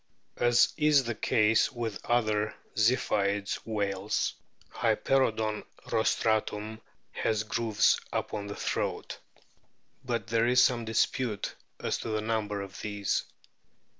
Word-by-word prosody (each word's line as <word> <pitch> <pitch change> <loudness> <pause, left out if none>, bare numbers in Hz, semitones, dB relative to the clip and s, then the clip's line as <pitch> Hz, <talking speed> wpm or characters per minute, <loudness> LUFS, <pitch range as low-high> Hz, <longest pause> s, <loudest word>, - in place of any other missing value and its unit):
As 120 0 +4
is 150 -3 +4
the 120 -1 -2
case 110 +1 +3
with 115 -4 -4
other 110 -3 +1 0.2
Ziphioid 105 -3 +1
whales, 100 -2 -1 0.4
Hyper 135 -1 +2
oodon 110 -1 -3 0.3
rostratum 110 0 0 0.3
has 110 -1 0
grooves 110 -1 +2
upon 105 -1 -3
the 100 - -5
throat. - - -3 0.8
But 120 -4 -2
there 115 0 +2
is 125 0 +5
some 120 -2 +2
dispute 110 0 0 0.3
as - - -1
to - - -5
the 110 -1 -1
number 105 -2 -1
of 100 0 -8
these. 100 -1 -1
110 Hz, 115 wpm, -29 LUFS, 105-120 Hz, 0.8 s, is